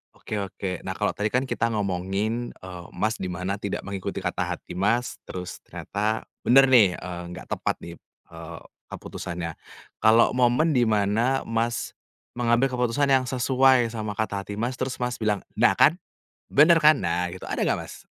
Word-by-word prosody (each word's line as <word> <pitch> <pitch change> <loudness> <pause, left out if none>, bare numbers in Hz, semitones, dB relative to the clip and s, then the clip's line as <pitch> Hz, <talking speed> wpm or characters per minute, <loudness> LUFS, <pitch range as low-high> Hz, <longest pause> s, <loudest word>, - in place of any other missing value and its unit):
Oke 105 - -5
oke, 95 -2 -4
nah, - - -3
kalau - - 0
tadi 105 - -1
kan 125 +4 0
kita 130 -3 -1
ngomongin, 105 +3 -2
eee, 90 -2 -10
Mas 110 +2 -1
di 95 - -3
mana 90 +3 -3
tidak 100 -1 -4
mengikuti 100 -2 -5
kata - - -1
hati - - -14
Mas 115 +6 0
terus 90 -1 -6
ternyata 110 +2 -2 0.2
benar 135 +3 +7
nih, 105 -8 +6
eee, 90 -1 -6
nggak 90 - -9
tepat - - -1
di, 85 - -7 0.4
eee, 80 0 -9 0.3
keputusannya. 85 -1 -6 0.5
Kalau 115 +2 +5
momen 125 +6 +3
di 125 -5 +3
mana 110 +5 +1
Mas 115 +1 -2 0.5
mengambil 120 +2 +2
keputusan 125 +3 +1
yang 130 -1 +4
sesuai 130 -1 +3
sama 110 -2 -4
kata 100 -2 -2
hati 105 - -6
Mas 120 +4 -3
terus 130 0 -2
Mas 125 0 -2
bilang, 105 -3 0
"Nah, - - +4
kan, 170 +4 +4 0.5
benar 160 +3 +6
kan," 150 -1 +6
nah, 90 +1 -1
gitu, 95 +1 -9
ada - - -2
nggak - - +1
Mas? - - -10
110 Hz, 170 wpm, -25 LUFS, 95-125 Hz, 0.5 s, benar